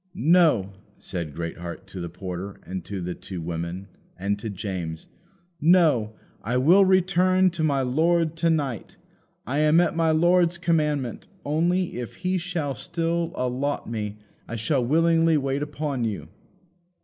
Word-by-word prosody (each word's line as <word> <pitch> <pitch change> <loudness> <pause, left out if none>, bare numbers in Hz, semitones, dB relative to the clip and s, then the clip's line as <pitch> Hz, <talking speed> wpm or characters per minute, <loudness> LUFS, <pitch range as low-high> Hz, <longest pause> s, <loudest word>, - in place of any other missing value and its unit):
"No," 150 - +3 0.2
said 80 -5 -5
Greatheart 85 +1 -6
to 95 - -7
the 85 - -4
porter, 90 +2 -6
and 95 -1 -5
to 100 -2 -5
the 90 +1 -3
two 95 0 -7
women, 85 +3 -4 0.3
and 100 +2 -1
to 110 +1 -5
James 90 -5 -5 0.6
"No. 155 -10 +4 0.3
I 120 +4 -1
will 170 +10 +6
return 185 0 +3
to 165 -2 -3
my 140 -3 +2
lord 160 +5 +2
to 170 0 +2
night. 140 -9 -2 0.5
I 140 +5 -1
am 155 +2 +5
at 175 -1 +2
my 165 -1 +2
lord's 175 +2 +3
commandment; 150 -7 0 0.2
only, 170 +2 0
if 120 - -6
he 185 0 -1
shall 165 -5 -2
still 170 +1 -2
allot 130 +3 -2
me 105 -2 -4 0.3
I 115 - -5
shall 130 +3 0
willingly 165 +4 +3
wait 135 0 -1
upon 145 -3 -3
you." 110 -3 -3
145 Hz, 150 wpm, -25 LUFS, 100-170 Hz, 0.6 s, will